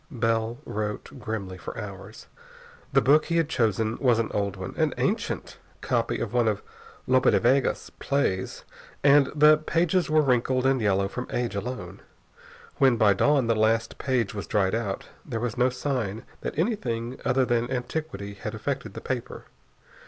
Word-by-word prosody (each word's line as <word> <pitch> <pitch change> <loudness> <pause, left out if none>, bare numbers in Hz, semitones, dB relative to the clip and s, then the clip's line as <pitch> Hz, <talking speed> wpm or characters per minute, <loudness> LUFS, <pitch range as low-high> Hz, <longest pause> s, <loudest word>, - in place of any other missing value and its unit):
Bell 115 -3 0
wrote 105 0 -4
grimly 100 -5 -5
for - - -7
hours. - - -9 0.7
The - - +4
book 150 +3 +5
he 170 - 0
had 165 -2 +2
chosen 110 - 0
was 125 -4 +3
an 115 -1 -1
old 100 -1 -1
one, 95 -1 -6
an - - +1
ancient - - -2 0.2
copy - - 0
of - - -3
one 120 -2 +3
of 105 -2 0 0.4
Lope 130 0 +3
de - - +4
Vega's 130 +3 +1
plays, 140 -10 -1 0.4
and 140 -1 +6
the 150 0 +6
pages 170 +1 +1
were 155 0 +4
wrinkled 130 0 +1
and 135 -2 +3
yellow 100 -2 +2
from 125 +5 -5
age 120 -2 -2
alone. 100 -3 -5 0.8
When, 130 -4 +4
by 105 -2 +5
dawn, 140 +5 +3
the 115 - +2
last 110 +1 +1
page 125 -6 0
was 100 -2 -5
dried 95 -2 +1
out, 110 -4 -2 0.2
there 115 -5 -4
was 120 -1 -2
no 125 +1 +3
sign 125 -5 -3 0.2
that - - -5
anything 130 - -1
other 130 0 +2
than 120 0 0
antiquity 125 -5 -4
had 100 - -6
affected - - -4
the - - -6
paper. - - -4
120 Hz, 165 wpm, -26 LUFS, 110-135 Hz, 0.8 s, and